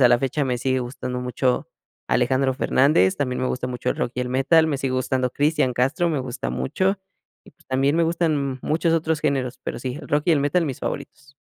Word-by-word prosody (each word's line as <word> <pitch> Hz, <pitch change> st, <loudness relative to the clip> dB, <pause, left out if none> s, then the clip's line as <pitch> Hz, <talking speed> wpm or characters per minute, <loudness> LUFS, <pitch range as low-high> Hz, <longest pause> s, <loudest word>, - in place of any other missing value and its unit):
a 125 Hz, -, +8 dB
la 120 Hz, 0 st, +5 dB
fecha 135 Hz, +3 st, -1 dB
me 125 Hz, -2 st, -1 dB
sigue 130 Hz, +1 st, 0 dB
gustando 125 Hz, 0 st, -4 dB
mucho 125 Hz, 0 st, -1 dB, 0.4 s
Alejandro 130 Hz, +2 st, +2 dB
Fernández, 130 Hz, -10 st, +3 dB
también 125 Hz, -3 st, -2 dB
me -, -, +1 dB
gusta 125 Hz, 0 st, -3 dB
mucho 125 Hz, -1 st, -2 dB
el -, -, -2 dB
rock 120 Hz, -, -1 dB
y -, -, 0 dB
el 125 Hz, -, -4 dB
metal, 145 Hz, +6 st, +4 dB
me 150 Hz, -, 0 dB
sigue 135 Hz, -1 st, -1 dB
gustando 130 Hz, 0 st, 0 dB
Cristian 145 Hz, -3 st, +1 dB
Castro, 150 Hz, +9 st, +1 dB
me 155 Hz, -4 st, 0 dB
gusta 125 Hz, -2 st, -4 dB
mucho, 190 Hz, +8 st, 0 dB, 0.5 s
y -, -, -16 dB
pues, -, -, -28 dB
también 135 Hz, +2 st, +2 dB
me 170 Hz, -, +3 dB
gustan 155 Hz, -5 st, 0 dB
muchos 165 Hz, +2 st, +1 dB
otros 160 Hz, -1 st, 0 dB
géneros, 130 Hz, -4 st, -1 dB
pero -, -, -4 dB
sí, 125 Hz, +1 st, -4 dB
el 140 Hz, -, -10 dB
rock 145 Hz, +1 st, +1 dB
y 170 Hz, -, +5 dB
el 150 Hz, -, +3 dB
metal, 150 Hz, +4 st, +1 dB
mis 135 Hz, -, -5 dB
favoritos. 140 Hz, 0 st, -6 dB
135 Hz, 225 wpm, -23 LUFS, 125-150 Hz, 0.5 s, a